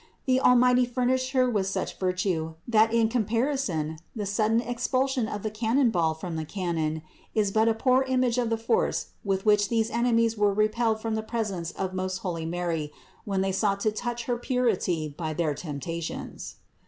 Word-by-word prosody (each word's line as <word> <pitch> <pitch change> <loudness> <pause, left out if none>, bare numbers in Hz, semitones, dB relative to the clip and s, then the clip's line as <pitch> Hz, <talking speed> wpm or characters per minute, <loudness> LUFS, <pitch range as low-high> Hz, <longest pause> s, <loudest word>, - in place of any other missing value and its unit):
The 260 -1 +3
Almighty 250 0 +5
furnished 255 +1 0
Her 255 -1 +4
with 205 -6 0
such 195 - -3
virtue, 180 -4 -1
that 220 -1 +4
in 230 -1 +3
comparison 220 - -1 0.2
the 210 -2 -3
sudden 215 +3 +2
expulsion 250 +1 0
of 205 -2 -5
the 215 - -2
cannon 230 +3 +2
ball 165 -5 +1
from 165 0 -5
the 160 - -2
cannon, 160 -3 -2 0.3
is 210 -2 +2
but 220 +2 +3
a 225 - +1
poor 255 +3 +3
image 255 -2 +1
of 240 -2 0
the 225 - +1
force 230 - 0
with 195 0 -1
which 210 -1 +4
these 225 -1 +1
enemies 230 -1 +2
were 205 -2 +2
repelled 220 +1 +1
from 225 0 -2
the 220 - 0
presence 215 -7 -3
of 190 -1 -3
most 185 0 -2
holy 165 -3 -2
Mary 165 -3 -2 0.3
when 195 -2 0
they 195 0 0
sought 200 +1 +1
to 215 - +2
touch 240 +2 -4
her 245 0 -1
purity 230 - 0
by 155 -2 -3
their 160 -3 0
temptations. 160 +2 -6
215 Hz, 180 wpm, -27 LUFS, 180-240 Hz, 0.3 s, Almighty